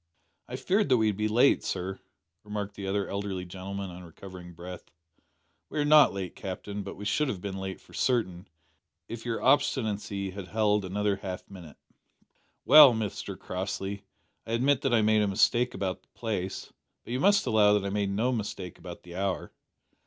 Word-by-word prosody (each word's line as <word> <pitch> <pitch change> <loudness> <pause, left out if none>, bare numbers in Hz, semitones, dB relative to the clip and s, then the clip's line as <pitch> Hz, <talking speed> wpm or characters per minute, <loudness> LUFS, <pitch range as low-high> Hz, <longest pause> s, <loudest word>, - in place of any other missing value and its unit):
"I 125 - -6
feared 190 +10 +1
that 130 - +5
we'd 110 -2 +2
be 105 +2 0
late, 120 +6 +4
sir," 95 +2 -3 0.4
remarked 105 -1 -5
the 100 -1 -6
other 100 0 -1
elderly 100 -2 -4
gentleman 95 +1 -6
on 90 +1 -10
recovering 90 +1 -11
breath. 90 +2 -9 0.8
"We - - -6
are 145 - +2
not 150 0 +7
late, 95 -2 -5
Captain, 100 +1 -5
but 100 - -7
we 105 - -8
should 145 +9 +1
have 105 -8 -3
been 95 +1 -5
late 95 0 -5
for - - -20
certain, 95 -8 0 0.6
if 115 0 -7
your 115 - -2
obstinacy 105 -7 +1
had 95 -1 -8
held 105 -2 +1
another 100 +1 0
half 95 -2 -6
minute." 85 -6 -11 0.9
"Well, 150 -5 +10
Mr 110 -3 -4
Crossley, 95 +1 -4 0.4
I 115 - -3
admit 130 +3 +2
that 135 - 0
I 110 - +3
made 110 0 +4
a 105 - +2
mistake 120 +5 +2
about 95 -2 -3
the - - -37
place, 100 -5 -4 0.3
but 120 - -6
you 125 - -1
must 200 +5 +4
allow 105 -2 +4
that 105 -1 +1
I 100 - -2
made 100 -1 0
no 110 +6 0
mistake 105 -6 -4
about 85 0 -10
the 85 - -11
hour. 95 0 -2
100 Hz, 180 wpm, -28 LUFS, 95-115 Hz, 0.9 s, Well